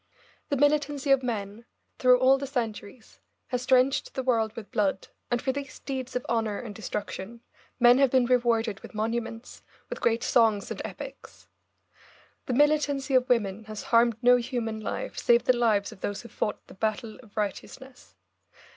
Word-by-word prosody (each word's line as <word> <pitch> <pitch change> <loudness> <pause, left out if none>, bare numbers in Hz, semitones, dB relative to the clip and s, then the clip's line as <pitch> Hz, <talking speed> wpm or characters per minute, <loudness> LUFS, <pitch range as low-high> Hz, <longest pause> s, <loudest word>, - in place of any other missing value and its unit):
The 285 - 0
militancy 290 0 +1
of 270 -1 +5
men, 220 -3 -4 0.4
through 250 0 +6
all 260 +2 +4
the 275 - -4
centuries, 225 -3 -5 0.3
has 250 -1 -2
drenched 260 +1 +2
the 265 - -2
world 225 -4 +1
with 225 -3 -9
blood, 195 -2 -1 0.2
and 240 - +1
for 265 - -1
these 275 0 -6
deeds 260 -2 -5
of 250 - -2
horror 225 -3 0
and 225 -4 -7
destruction 210 +1 -6 0.4
men 245 +1 +6
have 275 -1 +5
been 255 -1 +3
rewarded 235 -4 +1
with - - -12
monuments, 230 +2 -4 0.3
with - - -5
great 230 0 +1
songs 220 -5 +2
and - - -4
epics. - - -10 1.0
The 255 - -1
militancy 290 0 +2
of 255 -1 +3
women 220 -3 0
has 215 -1 -7
harmed 230 -1 +5
no 245 0 +7
human 235 -2 -3
life 215 - -4
save 235 0 +4
the 255 - +3
lives 220 -4 +1
of 215 - -14
those 205 +2 -4
who 235 - -11
fought 210 - -3
the - - -14
battle 220 +3 -3
of 225 -3 -21
righteousness. 250 +5 -6
235 Hz, 170 wpm, -27 LUFS, 220-260 Hz, 1.0 s, no